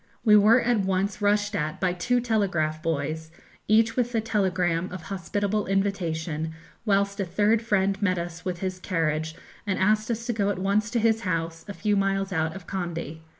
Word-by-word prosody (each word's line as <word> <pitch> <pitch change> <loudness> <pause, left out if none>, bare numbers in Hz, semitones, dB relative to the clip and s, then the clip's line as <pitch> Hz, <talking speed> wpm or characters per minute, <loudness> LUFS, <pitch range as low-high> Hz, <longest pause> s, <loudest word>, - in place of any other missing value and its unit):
We 210 -2 +7
were 215 +4 +6
at 240 -2 +2
once 195 +1 -1
rushed 205 +1 +2
at 155 -4 -2
by 185 -2 +1
two 245 +8 +1
telegraph 185 -10 0
boys, 160 0 -2 0.4
each 225 +1 +4
with 245 -1 0
a - - +3
telegram 185 -5 0
of 180 -2 -7
hospitable 200 +3 -2
invitation, 165 -5 -1 0.3
whilst 200 0 +2
a - - +1
third 205 +5 +2
friend 200 -3 +1
met 185 -3 +2
us 170 0 -5
with 180 -2 -4
his 185 -1 -3
carriage, 160 -3 -1 0.3
and 190 - 0
asked 215 +3 +2
us 230 0 -2
to 240 - -1
go 205 -2 0
at 205 - -1
once 200 +3 +1
to 235 +2 0
his 225 0 +2
house, 165 -3 -2
a 200 - -5
few 205 +4 +1
miles 195 -1 0
out 160 0 0
of 195 -3 -9
Kandy. 170 -4 -4
195 Hz, 190 wpm, -26 LUFS, 170-210 Hz, 0.4 s, We